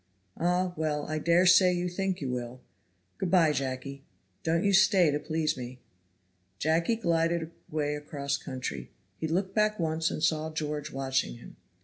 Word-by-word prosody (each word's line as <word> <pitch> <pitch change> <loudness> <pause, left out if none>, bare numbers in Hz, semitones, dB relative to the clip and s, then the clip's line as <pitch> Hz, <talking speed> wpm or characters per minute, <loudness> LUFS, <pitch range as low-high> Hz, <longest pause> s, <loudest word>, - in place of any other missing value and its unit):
"Ah! 180 +1 0
well 150 -2 -1
I 155 0 -2
daresay 180 +3 +5
you 175 0 -1
think 190 0 -2
you 135 - -2
will. 125 0 -5 0.6
Good 190 -2 -1
by, 170 -4 +5
Jacky; 135 0 -4 0.4
don't 165 +1 +1
you 200 -1 +2
stay 190 -5 +5
to 145 - -1
please 155 -1 -1
me." 125 -1 -7 0.8
Jacky 165 - +1
glided 165 -4 0 0.2
away 150 -1 -1
across 145 -1 -3
country. 125 - -5 0.3
He 160 - -1
looked 185 +4 -1
back 215 0 +2
once 160 0 0
and 155 - -4
saw 155 -1 +1
George 150 -1 -3
watching 135 - -1
him. - - -13
160 Hz, 155 wpm, -29 LUFS, 145-175 Hz, 0.8 s, daresay